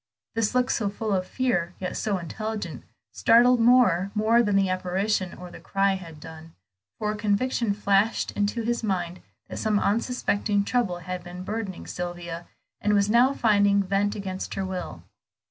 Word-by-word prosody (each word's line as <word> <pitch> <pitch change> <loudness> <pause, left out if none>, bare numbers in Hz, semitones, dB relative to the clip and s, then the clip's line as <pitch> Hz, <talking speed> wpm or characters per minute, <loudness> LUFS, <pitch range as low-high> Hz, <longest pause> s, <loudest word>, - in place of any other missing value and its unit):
This 225 +1 0
look, 250 0 +2
so 210 -3 0
full 210 +1 -3
of 185 -1 0
fear, 180 -10 -1
yet 185 -1 -4
so 205 -3 -1
intelligent, 215 +5 -5 0.3
startled 240 +2 +5
Moor 230 -6 +4
more 220 +3 +4
than 205 -4 +1
the 195 -1 +3
apparition 185 +1 -1
or 180 -1 -9
the - - -11
cry 195 0 +1
had 170 -5 -8
done, 160 +1 -11 0.4
for 210 0 -1
a - - -4
conviction 215 +2 0
flashed 200 +2 +1
into 205 +3 -1
his 235 +1 -1
mind 180 -4 -2 0.3
that - - -7
some 215 -2 +1
unsuspected 205 -2 0
trouble 225 -8 0
had 180 +1 -6
been 180 +1 -8
burdening 205 -2 -5
Sylvia, 175 -1 -6 0.3
and 210 0 +2
was 200 +1 +2
now 245 +4 +5
finding 205 -2 +3
vent 200 +2 0
against 190 -2 -5
her 195 - -2
will. 185 -1 -5
200 Hz, 165 wpm, -26 LUFS, 185-220 Hz, 0.4 s, startled